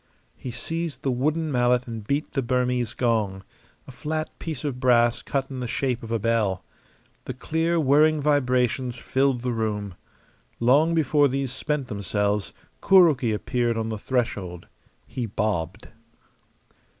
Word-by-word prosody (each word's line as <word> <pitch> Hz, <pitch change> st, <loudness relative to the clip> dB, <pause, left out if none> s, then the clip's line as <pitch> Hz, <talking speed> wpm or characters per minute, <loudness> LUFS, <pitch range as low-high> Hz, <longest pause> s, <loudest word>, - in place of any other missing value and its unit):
He 130 Hz, -, -7 dB
seized 160 Hz, +2 st, -4 dB
the 135 Hz, -, +1 dB
wooden 155 Hz, +5 st, 0 dB
mallet 125 Hz, -1 st, +2 dB
and 115 Hz, -3 st, -6 dB
beat 145 Hz, +2 st, -1 dB
the 135 Hz, -, 0 dB
Burmese 125 Hz, -1 st, 0 dB
gong 105 Hz, -6 st, 0 dB, 0.4 s
a -, -, -9 dB
flat 155 Hz, +4 st, -3 dB
piece 155 Hz, -5 st, -5 dB
of 140 Hz, -4 st, -3 dB
brass 120 Hz, -2 st, +3 dB
cut 135 Hz, -1 st, -3 dB
in 130 Hz, -, -5 dB
the 125 Hz, -, -3 dB
shape 125 Hz, 0 st, -1 dB
of 115 Hz, -, -8 dB
a 115 Hz, -, +2 dB
bell. 105 Hz, -4 st, 0 dB, 0.6 s
The -, -, -5 dB
clear, 165 Hz, +2 st, 0 dB
whirring 155 Hz, +2 st, +4 dB
vibrations 130 Hz, -3 st, +1 dB
filled 135 Hz, -1 st, 0 dB
the 125 Hz, 0 st, -1 dB
room. 105 Hz, -3 st, -2 dB, 0.7 s
Long 145 Hz, +8 st, +4 dB
before 150 Hz, -2 st, +3 dB
these 135 Hz, -1 st, -2 dB
spent 140 Hz, +1 st, -2 dB
themselves 105 Hz, -2 st, -1 dB, 0.3 s
Kuroki 160 Hz, -, +5 dB
appeared 120 Hz, +2 st, -1 dB
on 115 Hz, 0 st, -2 dB
the 110 Hz, -, -3 dB
threshold. 100 Hz, -8 st, -2 dB, 0.4 s
He 120 Hz, -3 st, -4 dB
bobbed. 100 Hz, -2 st, -2 dB
125 Hz, 145 wpm, -25 LUFS, 115-145 Hz, 0.7 s, Kuroki